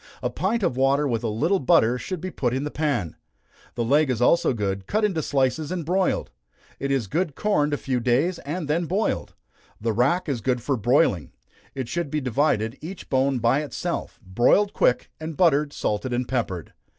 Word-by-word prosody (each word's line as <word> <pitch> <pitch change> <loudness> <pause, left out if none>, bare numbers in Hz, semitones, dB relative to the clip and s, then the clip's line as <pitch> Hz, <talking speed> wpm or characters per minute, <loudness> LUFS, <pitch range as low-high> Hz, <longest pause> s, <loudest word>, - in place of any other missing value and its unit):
A 125 - 0
pint 200 - -1
of 170 -9 +1
water 135 +3 +2
with 115 -3 -1
a - - 0
little 155 - +1
butter 125 -1 +3
should 185 +2 -5
be 185 +1 -4
put 125 -5 -1
in 135 - -1
the 150 - -4
pan. 140 - -1 0.6
The 120 - -1
leg 145 +5 +3
is 125 -3 0
also 135 +7 +3
good, 100 -4 -3
cut 215 +2 +1
into 185 -6 0
slices 140 +2 0
and 175 -4 -3
broiled. 185 +3 0 0.5
It 140 - -2
is 135 -4 +1
good 155 - -2
corned 150 -9 +1
a 145 - 0
few 130 -3 -1
days, 130 +9 +1
and 155 +2 -4
then 165 +3 0
boiled. 200 +6 -1 0.4
The 115 +1 -1
rack 140 - +1
is 135 -6 -2
good 125 +1 0
for 140 - 0
broiling 115 - +2 0.4
it 130 -3 -3
should 170 0 -2
be 150 - -1
divided, 125 -3 0
each 180 +4 -9
bone 135 0 +2
by 120 +5 +2
itself, 145 -6 -4
broiled 120 - +3
quick, 125 - +1
and 160 -1 -6
buttered, 150 -5 +3
salted 120 0 -2
and 125 0 -1
peppered. 95 -10 -3
140 Hz, 195 wpm, -24 LUFS, 120-165 Hz, 0.6 s, butter